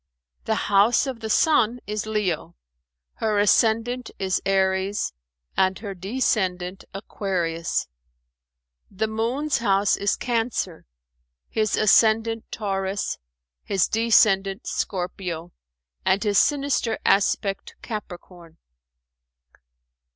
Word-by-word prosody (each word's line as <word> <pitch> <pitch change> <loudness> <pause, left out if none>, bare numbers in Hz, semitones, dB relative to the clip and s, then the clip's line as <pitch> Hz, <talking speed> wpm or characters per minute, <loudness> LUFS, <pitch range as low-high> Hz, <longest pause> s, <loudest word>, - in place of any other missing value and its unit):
The - - +1
house 210 +6 +4
of 260 -4 -5
the 220 -1 -5
Sun 245 -3 +3
is 210 0 -3
Leo, 190 - -2 0.6
her 215 -2 0
ascendant 225 +4 +2
is 190 -1 -1
Aries, 190 - +1 0.4
and 190 0 +2
her 205 -2 -6
descendant 190 -3 -1
Aquarius. 180 -4 -2 1.0
The 210 +3 -2
Moon's 235 +7 -1
house 200 -3 +2
is 200 - 0
Cancer, 230 - -2 0.6
his 215 -1 0
ascendant 220 +2 +3
Taurus, 195 -2 -2 0.4
his 195 -3 +1
descendant 215 -3 +3
Scorpio 180 -2 -4 0.5
and 195 +3 +2
his 205 -2 +3
sinister 280 -6 +1
aspect 195 0 +1
Capricorn. 175 -5 -8
205 Hz, 90 wpm, -24 LUFS, 190-225 Hz, 1.0 s, house